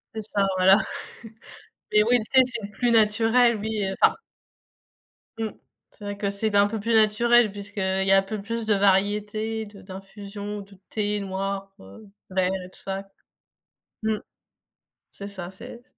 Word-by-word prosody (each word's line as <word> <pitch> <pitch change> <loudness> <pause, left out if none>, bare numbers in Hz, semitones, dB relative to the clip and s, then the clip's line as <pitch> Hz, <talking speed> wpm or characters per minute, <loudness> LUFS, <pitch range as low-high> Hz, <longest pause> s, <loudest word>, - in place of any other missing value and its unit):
C'est 220 - -3
ça, 205 -1 0
voilà. 190 +2 +6 1.2
Mais 210 0 +6
oui, 245 +3 +4
le 215 - -4
thé 260 -1 +7
c'est 240 -3 -6
le 205 - -15
plus 240 +4 0
naturel, 225 +2 +4
oui, 215 -1 -2
heu, 190 - -2
enfin - - +6 1.3
Mmh. 220 -1 -1 0.4
C'est 210 - -16
vrai 205 0 -4
que 200 -1 -1
c'est 215 +2 -1
d 205 - +1
un 200 0 +5
peu 220 +1 -4
plus 230 +3 -1
naturel 220 +1 +4
puisque, 205 +1 -10
heu, 190 0 0
il 190 - -1
y 195 - +4
a 195 - +7
un - - +5
peu 215 +1 -5
plus 230 +2 -4
de 215 - +3
variétés 210 +3 +1
de 205 -1 -13
d'infusion, 200 +2 -8
de 195 -1 -15
thé 210 -1 -1
noir, 195 0 -4
heu, 95 - -14 0.2
vert 185 0 +1
et - - -12
tout - - -8
ça. 195 0 -5 0.9
Mmh. 220 -1 0 0.9
C'est 200 - -8
ça, 190 -3 -7
c'est 235 +5 -11
205 Hz, 180 wpm, -25 LUFS, 195-220 Hz, 1.3 s, thé